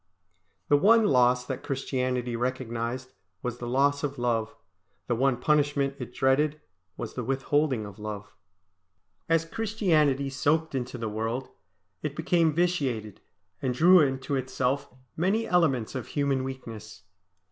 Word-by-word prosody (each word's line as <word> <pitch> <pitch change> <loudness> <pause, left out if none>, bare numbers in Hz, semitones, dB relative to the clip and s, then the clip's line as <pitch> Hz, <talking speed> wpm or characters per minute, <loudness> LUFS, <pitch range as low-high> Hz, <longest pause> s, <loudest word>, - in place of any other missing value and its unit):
The 145 - +5
one 220 +7 +5
loss 125 -4 +4
that - - -4
Christianity 130 -3 -2
recognised 125 +1 -3 0.3
was 125 -1 -3
the 120 - -5
loss 140 +3 +2
of 140 -1 -2
love; 115 -2 -1 0.5
the - - 0
one 130 +1 +2
punishment 145 0 +1
it 125 -1 -6
dreaded 145 +4 +2 0.4
was - - -5
the 125 - -4
withholding 135 -1 0
of 100 0 -11
love. 105 -1 -6 1.0
As 165 0 +3
Christianity 165 -10 +1
soaked 155 +4 +1
into 125 -1 -3
the 115 -1 -3
world, 115 +4 -3 0.5
it 145 -2 -4
became 165 0 +2
vitiated, 140 - -1 0.4
and 130 -2 -1
drew 180 +7 +7
into 135 -1 +1
itself 130 +1 -1 0.3
many 195 +7 +1
elements 140 -11 +2
of 130 -3 -5
human 140 -3 0
weakness. 110 -6 -8
135 Hz, 135 wpm, -27 LUFS, 125-150 Hz, 1.0 s, drew